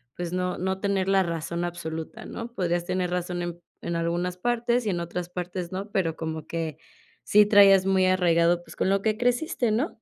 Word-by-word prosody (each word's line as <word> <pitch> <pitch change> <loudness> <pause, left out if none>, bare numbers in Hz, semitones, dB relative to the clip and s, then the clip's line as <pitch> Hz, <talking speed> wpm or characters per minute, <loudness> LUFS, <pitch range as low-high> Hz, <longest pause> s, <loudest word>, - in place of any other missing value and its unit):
pues 175 0 -4
no 180 0 -1
no 190 +1 -2
tener 195 -1 0
la 195 -1 +4
razón 170 0 -3
absoluta, 160 -2 -6
¿no? 235 +1 -7
Podrías 175 -3 -1
tener 180 0 -1
razón 180 0 -2
en 175 0 -5 0.2
en 170 - -2
algunas 175 +2 -1
partes 240 +2 0
y 205 - +1
en 175 - -1
otras 170 +1 -4
partes 180 0 -5
no, 195 +3 -5
pero 175 -6 0
como 160 -1 -5
que 165 -2 -4 0.5
sí 210 0 +5
traías 195 -2 +7
muy 190 -1 +3
arraigado, 175 -2 +3
pues, - - -13
con 190 - 0
lo 195 0 +2
que 215 +1 0
creciste, 245 -1 0
¿no? 250 +10 +1
180 Hz, 200 wpm, -26 LUFS, 170-200 Hz, 0.5 s, traías